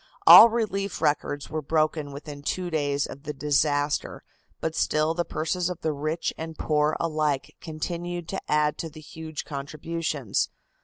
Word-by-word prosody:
All 235 - +11
relief 200 -4 -2
records 145 -1 -1
were 155 0 -2
broken 155 0 0
within 145 0 -8
two 175 +4 -3
days 145 -2 0
of 140 - -9
the 150 0 -5
disaster, 145 0 0 0.4
but 160 - -2
still 155 +1 +1
the 175 +1 0
purses 170 +2 -2
of 180 -1 -6
the 155 - 0
rich 155 +3 -2
and 160 0 -6
poor 150 0 +1
alike 155 -4 -1
continued 170 +2 -4
to 195 - -3
add 150 0 +2
to 165 - -4
the 155 +1 -12
huge 155 0 -7
contributions. 150 -3 -2
155 Hz, 155 wpm, -26 LUFS, 145-165 Hz, 0.4 s, All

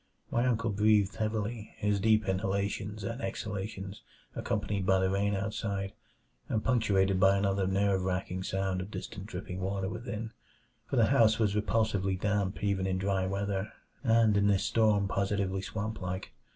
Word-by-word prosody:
My 120 +2 +2
uncle 115 -2 +1
breathed 105 -1 +3
heavily, 110 0 -3
his 105 -1 +1
deep 110 0 +3
inhalations 100 +2 -1
and 115 +5 -4
exhalations 100 -3 -5 0.3
accompanied 100 -2 -1
by 95 0 +4
the 95 0 +1
rain 100 +1 +1
outside, 100 -1 -2 0.6
and 110 - 0
punctuated 100 -6 +2
by 95 +1 +5
another 100 -1 +1
nerve 95 0 +2
racking 95 0 -2
sound 95 0 -1
of 95 - -6
distant 100 -2 -7
dripping 90 -2 -6
water 95 0 -1
within 115 0 -5 0.6
for - - -1
the 115 -3 +5
house 110 -4 +5
was 105 -3 +1
repulsively 105 -3 +1
damp 105 -1 -1
even 100 -2 +1
in 95 -1 0
dry 95 0 0
weather, 100 +1 -2 0.3
and 115 -3 +4
in 100 0 +3
this 100 -2 +3
storm 105 -3 +3
positively 100 -1 0
swamp 110 +2 -4
like. 90 0 -4
100 Hz, 155 wpm, -30 LUFS, 95-110 Hz, 0.6 s, by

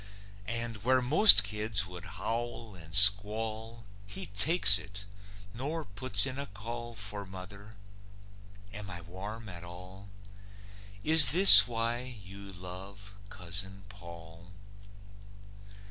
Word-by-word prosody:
And, 115 -1 -4
where 130 +2 +2
most 130 - +7
kids 105 0 -2
would 90 -1 -11
howl 115 -1 -6
and 80 -3 -15
squall, 110 +3 +1 0.2
He 100 - -5
takes 105 - +3
it, 100 0 -12 0.5
nor 150 +6 -6
puts 100 0 +1
in 130 0 -7
a 140 - -7
call 115 +3 -10
For 100 0 -6
mother? 100 +3 -13 1.0
Am 100 -1 -9
I 90 -1 -8
warm 100 +6 -11
at 90 -3 -11
all? 90 +3 -13 1.0
Is 155 -3 +5
this 135 - +8
why 115 0 -4 0.2
you 100 +1 -12
love 95 +2 -12 0.2
Cousin 95 0 -7
Paull? 85 -2 -15
100 Hz, 115 wpm, -28 LUFS, 95-115 Hz, 1.0 s, this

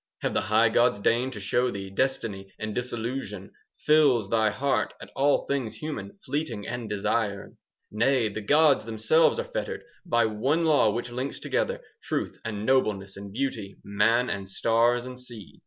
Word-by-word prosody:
Have - - 0
the - - +1
high - - +3
gods - - +3
deigned 120 +5 +1
to 105 - -7
show 120 +5 +1
thee 100 -3 -6
5 95 - -16
Destiny, 105 -7 -1
and 110 -1 -4
disillusion 120 -4 -4 0.3
Fills 140 -9 +3
thy 110 -1 +3
heart 135 +7 -1
at - - -11
all 140 +1 +2
things 130 -6 -2
human, 105 -7 -6
Fleeting 130 -7 -3
and 120 -2 -4
desired? 105 0 -1 0.4
Nay, 120 +2 +2
the 105 +1 -5
gods 145 +3 +4
themselves 115 - +3
are 485 - -1
fettered - - -3 0.2
By 120 -11 +2
one 130 +10 +1
law 150 -8 +4
which 120 +2 -4
links 130 +3 -4
together - - -1
10 - - -21 0.2
Truth - - -3
and 105 -1 -4
nobleness 105 -7 +1
and 100 0 -9
beauty, 110 -4 -3
Man 115 +5 +2
and 95 -1 -4
stars 115 +4 +2
and 125 0 -8
sea. 120 -6 -10
115 Hz, 170 wpm, -27 LUFS, 105-130 Hz, 0.4 s, gods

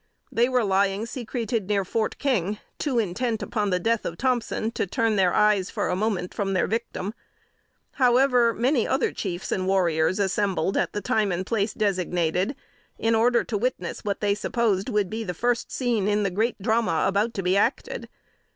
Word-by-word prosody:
They 240 +2 +2
were 250 -2 +2
lying 195 +1 +1
secreted 235 -3 -3
near 200 -2 +1
Fort 220 +3 -1
King, 210 -7 0 0.2
too 275 -5 -1
intent 225 +2 -1
upon 210 -3 -1
the 180 -1 +1
death 230 +4 0
of 170 - -4
Thompson 240 -3 0
to 215 - -2
turn 225 +4 +1
their 185 -3 +3
eyes 210 -2 +3
for - - -2
a 180 - +1
moment 190 -3 -1
from 195 -1 -1
their 185 - +2
victim. 220 -2 -3 0.8
However, 250 -2 +4
many 245 +2 +1
other 265 - +1
chiefs 180 -2 -4
and 185 -1 -1
warriors 175 -3 +2
assembled 195 -3 0
at - - 0
the 205 - -2
time 205 +1 +1
and 180 +2 -2
place 210 -1 -1
designated, 180 - 0 0.4
in 225 0 +1
order 235 +2 +3
to 220 - -2
witness 230 -7 -3
what 200 -1 -2
they 205 -1 +2
supposed 205 -2 0
would 210 -2 +1
be 225 +1 -3
the 180 -4 -4
first 240 +4 0
scene 235 -6 0
in 210 0 +2
the 195 - 0
great 220 +6 0
drama 220 -4 +1
about 205 +4 0
to 195 - -2
be 180 +1 +2
acted. 230 +6 -1
210 Hz, 185 wpm, -25 LUFS, 190-235 Hz, 0.8 s, However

